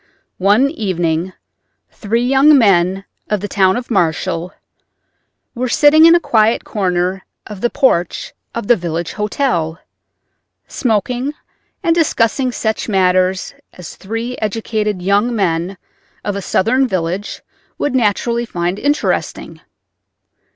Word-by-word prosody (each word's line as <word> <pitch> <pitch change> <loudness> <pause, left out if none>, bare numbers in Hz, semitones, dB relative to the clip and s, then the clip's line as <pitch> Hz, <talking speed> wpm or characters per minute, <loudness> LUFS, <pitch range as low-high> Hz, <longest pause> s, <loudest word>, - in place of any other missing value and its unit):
One 210 +9 +3
evening 175 - -2 0.6
three 230 +3 -1
young 275 +3 +5
men 195 -4 +2 0.2
of 210 - 0
the 205 - -4
town 190 -1 +2
of 245 0 -6
Marshall 170 -2 0 1.0
were 250 +1 -3
sitting 310 +3 +6
in 335 - +7
a - - +4
quiet 225 -7 +2
corner 185 -2 -1 0.2
of 210 -3 -9
the 240 - +1
porch 235 - 0 0.2
of 235 - -3
the 240 - +5
village 170 -2 -4
hotel, 185 - -1 0.9
smoking 250 +4 -1 0.5
and 335 -2 +3
discussing 260 -5 +1
such 220 -1 -2
matters 185 0 +1 0.2
as 180 - -10
three 225 +5 -5
educated 215 -2 -2
young 205 +5 +1
men 180 -1 -1 0.5
of 205 - -2
a 200 - -3
Southern 255 +8 +1
village 185 0 -3 0.3
would 290 - -1
naturally 235 0 +1
find 175 +1 -2
interesting. 290 +1 -2
210 Hz, 120 wpm, -16 LUFS, 185-245 Hz, 1.0 s, in